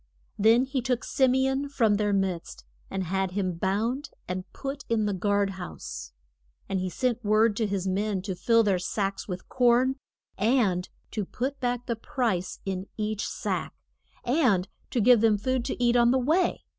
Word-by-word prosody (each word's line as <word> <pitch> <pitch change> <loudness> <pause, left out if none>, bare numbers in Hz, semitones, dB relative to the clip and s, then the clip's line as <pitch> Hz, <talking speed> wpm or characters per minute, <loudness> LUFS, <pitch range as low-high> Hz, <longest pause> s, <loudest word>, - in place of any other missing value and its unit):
Then 225 +4 +5
he 265 -1 -2
took 245 -1 -1
Sim 260 -2 +2
e 265 0 +3
on 270 +1 -1
from 230 -7 +2
their 205 0 +1
midst, 185 - -2 0.2
and 190 - -2
had 190 +1 -1
him 185 -3 -1
bound, 225 - -1 0.2
and 185 +1 -5
put 275 +1 -5
in 225 -2 +2
the 205 - 0
guard 200 +1 +1
house. - - -7 0.6
And 195 - -1
he 185 0 -2
sent 245 +3 -1
word 215 +1 +3
to 220 - +1
his 195 -2 -2
men 195 0 -1
to 195 -1 -3
fill 230 +5 +3
their 195 -4 +2
sacks 195 +2 -2
with 180 -2 -6
corn, 255 +1 +3 0.4
and 205 -6 +2 0.2
to 215 - -2
put 265 +8 -4
back 245 -1 -1
the 235 - -1
price 225 -8 -2
in 190 0 -3
each 215 -1 -2
sack, - - -3 0.5
and 240 - +2 0.2
to 240 - 0
give 240 0 +6
them 220 -2 +4
food 255 +4 -1
to - - -3
eat 240 0 +3
on 240 -1 +5
the 260 - +4
way. 315 +8 +1
215 Hz, 180 wpm, -27 LUFS, 195-250 Hz, 0.6 s, give